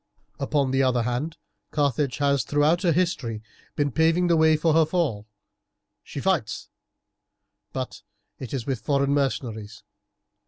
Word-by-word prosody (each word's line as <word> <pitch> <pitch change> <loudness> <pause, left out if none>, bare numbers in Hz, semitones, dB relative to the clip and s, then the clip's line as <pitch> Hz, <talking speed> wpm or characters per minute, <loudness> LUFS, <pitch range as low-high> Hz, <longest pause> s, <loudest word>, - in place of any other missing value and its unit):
"Upon 140 -1 +1
the 135 0 +2
other 125 -3 +2
hand, 125 +7 -2 0.3
Carthage 140 -3 0
has 140 -1 +2
throughout 150 +4 +2
her 175 -3 +3
history 145 -11 -1 0.3
been 145 -2 0
paving 165 +5 +3
the 170 -1 +3
way 160 -1 +5
for 160 +1 +2
her 160 +1 +5
fall. 150 - -1 0.8
She - - -7
fights, 140 - -1 1.0
but - - -5 0.4
it 130 - -7
is 130 -5 -3
with 135 -4 -2
foreign 140 +3 +1
mercenaries. 115 -6 -2
140 Hz, 140 wpm, -25 LUFS, 125-160 Hz, 1.0 s, way